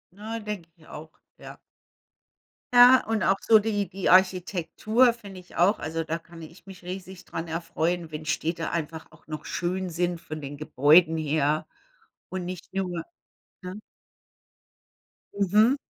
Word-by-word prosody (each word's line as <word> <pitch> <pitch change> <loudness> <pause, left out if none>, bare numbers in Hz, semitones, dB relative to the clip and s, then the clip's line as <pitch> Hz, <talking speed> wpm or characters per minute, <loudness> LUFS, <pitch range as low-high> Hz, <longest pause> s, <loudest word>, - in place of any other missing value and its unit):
Ja, 220 +3 -5
denke 210 -6 -6
ich 155 - -20
auch, 155 +1 -10 0.3
ja. - - -11 1.2
Ja, 245 +1 +8
und 225 -1 -1
auch 195 +1 +3
so 220 -1 +5
die 205 -2 -1
die 195 0 -2
Architektur, 185 +6 +3
finde 200 -5 -11
ich 180 - -16
auch. 185 +5 +4
Also, 165 +1 -3
da 165 +1 -3
kann 165 0 -14
ich 165 +3 -13
mich 190 -2 -12
riesig 185 +1 -8
dran 165 +1 -6
erfreuen, 165 0 -2
wenn 155 0 -6
Städte 165 +2 -2
einfach 160 -1 -4
auch - - -21
noch 155 0 -6
schön 180 0 -2
sind 175 +1 -1
von 155 -1 -7
den 145 +1 -7
Gebäuden 155 +3 +4
her 155 -1 0 0.6
und 185 -1 -4
nicht 180 0 -8
nur 180 -3 -2 0.6
ne? 185 +3 -7 1.5
Mhm. 210 +6 +4
175 Hz, 145 wpm, -26 LUFS, 160-195 Hz, 1.5 s, Ja